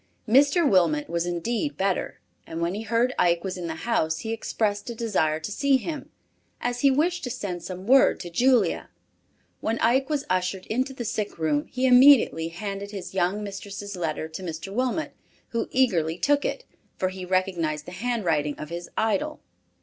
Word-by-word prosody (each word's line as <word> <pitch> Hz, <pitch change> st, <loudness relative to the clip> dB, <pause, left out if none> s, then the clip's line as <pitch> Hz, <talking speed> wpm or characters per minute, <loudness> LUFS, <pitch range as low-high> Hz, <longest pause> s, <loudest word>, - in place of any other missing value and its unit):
Mr. 285 Hz, +7 st, +5 dB
Wilmot 165 Hz, -, +3 dB
was 170 Hz, +1 st, -1 dB
indeed 225 Hz, -, -2 dB
better 195 Hz, -1 st, -1 dB, 0.3 s
and 165 Hz, -, -5 dB
when 170 Hz, +1 st, 0 dB
he 210 Hz, -, -4 dB
heard 230 Hz, +3 st, +1 dB
Ike 170 Hz, -1 st, +3 dB
was 190 Hz, -1 st, -3 dB
in 180 Hz, -2 st, -5 dB
the 160 Hz, -, -4 dB
house 160 Hz, -9 st, 0 dB
he 225 Hz, 0 st, -3 dB
expressed 215 Hz, -1 st, -2 dB
a 235 Hz, -, -5 dB
desire 185 Hz, -9 st, 0 dB
to 160 Hz, +6 st, -6 dB
see 275 Hz, +4 st, +3 dB
him, 300 Hz, +3 st, -6 dB, 0.5 s
as 245 Hz, 0 st, -2 dB
he 280 Hz, -, +6 dB
wished 330 Hz, +7 st, +1 dB
to -, -, -3 dB
send 200 Hz, -8 st, -4 dB
some 185 Hz, +2 st, -7 dB
word 265 Hz, +4 st, +5 dB
to 175 Hz, -, -7 dB
Julia. 240 Hz, -1 st, +2 dB, 0.7 s
When 225 Hz, +1 st, -1 dB
Ike 260 Hz, +5 st, +2 dB
was 295 Hz, -2 st, -1 dB
ushered 185 Hz, +1 st, -1 dB
into 260 Hz, +4 st, -1 dB
the 240 Hz, -, -5 dB
sick 210 Hz, -1 st, -3 dB
room, 150 Hz, -2 st, 0 dB
he 255 Hz, +1 st, -1 dB
immediately 250 Hz, -, +6 dB
handed 200 Hz, +3 st, -5 dB
his 200 Hz, -3 st, -7 dB
young 190 Hz, +3 st, 0 dB
mistress' 200 Hz, 0 st, -6 dB
letter 160 Hz, -3 st, -2 dB
to 160 Hz, +4 st, -8 dB
Mr. 175 Hz, +2 st, -6 dB
Wilmot, 255 Hz, +6 st, -1 dB, 0.4 s
who 230 Hz, -, -2 dB
eagerly 175 Hz, -11 st, +2 dB
took 285 Hz, +6 st, +2 dB
it, -, -, -3 dB, 0.3 s
for 185 Hz, -, 0 dB
he 185 Hz, 0 st, -7 dB
recognized 180 Hz, -5 st, -1 dB
the -, -, -9 dB
handwriting 180 Hz, -8 st, -1 dB
of 150 Hz, -, -7 dB
his 170 Hz, 0 st, -6 dB
idol. 220 Hz, -3 st, 0 dB
200 Hz, 180 wpm, -25 LUFS, 175-245 Hz, 0.7 s, he